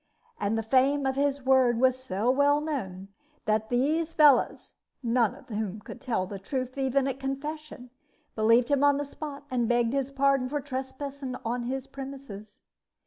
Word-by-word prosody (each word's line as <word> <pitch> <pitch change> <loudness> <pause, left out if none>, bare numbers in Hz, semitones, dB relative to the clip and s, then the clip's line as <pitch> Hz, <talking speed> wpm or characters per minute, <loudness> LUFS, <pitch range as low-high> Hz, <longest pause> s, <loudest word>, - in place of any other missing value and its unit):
And 210 +2 0
the 225 - -1
fame 270 +4 +3
of 265 0 0
his 280 0 0
word 260 -3 +4
was 255 0 +2
so 215 +1 0
well 285 +2 +3
known 200 -12 -4 0.4
that 215 0 0
these 310 +7 +1
fellows 290 -6 +4 0.3
(none 235 -2 +2
of - - -17
whom 215 -2 -3
could 235 - -11
tell 225 -7 -1
the 195 +1 -7
truth, 255 +5 -4
even 270 0 +1
at 270 0 -3
confession) 275 -1 -5 0.4
believed 230 +2 +3
him 285 -1 +2
on 285 -1 +5
the 290 - -2
spot, 285 0 -8
and 240 -3 0
begged 240 0 +2
his 275 -1 0
pardon 275 -2 +2
for 295 +1 -1
trespassing 265 0 -5
on 240 +1 -2
his 265 +1 -3
premises. 270 -7 -9
260 Hz, 170 wpm, -28 LUFS, 235-280 Hz, 0.4 s, on